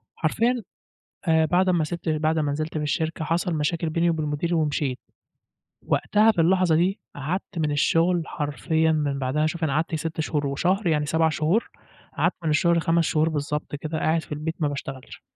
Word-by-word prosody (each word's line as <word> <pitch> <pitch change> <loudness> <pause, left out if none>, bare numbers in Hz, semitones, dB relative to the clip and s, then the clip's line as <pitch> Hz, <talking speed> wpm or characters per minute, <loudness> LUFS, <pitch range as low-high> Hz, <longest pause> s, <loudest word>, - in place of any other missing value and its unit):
حرفيًا 230 +8 0 0.7
آآ، 160 -1 +4
بعد 185 +3 +2
امّا 170 -4 +2
سِبت 170 0 -5
بعد 155 +1 +1
ما 145 -2 0
نزلت 155 +2 -3
في - - -2
الشركة 160 +2 -1
حصل 170 +2 0
مشاكل 160 +2 -1
بيني 170 +1 +2
وبين 155 -2 -1
مديري 155 +4 -1
ومشيت. 150 -4 0 0.9
وقتها 215 +2 +3
في 170 - -1
اللحظة 180 -1 +3
دي 190 +5 +1 0.2
قعدت 170 +5 -4
من 155 -2 0
الشغل 165 +4 +2
حرفيًا 160 +2 0
من 145 -3 0
بعدها 140 +4 0
شوف 165 +1 -2
أنا 140 - 0
قعدت 160 +2 0
6 160 0 -3
شهور 150 -2 -1
وشهر 180 +8 0
يعني 150 -2 +2
7 160 +1 +2
شهور، 155 +8 0 0.5
قعدت - - +2
من 155 - +1
الشغل 170 +2 +3
5 165 0 +2
شهور 155 0 +2
بالضبط 150 -1 -3
كده 155 +2 -4
قاعد 160 +1 +1
في - - -11
البيت 155 +2 -3
ما 150 - +2
باشتغلش. 135 -2 -7
160 Hz, 185 wpm, -24 LUFS, 150-170 Hz, 0.9 s, آآ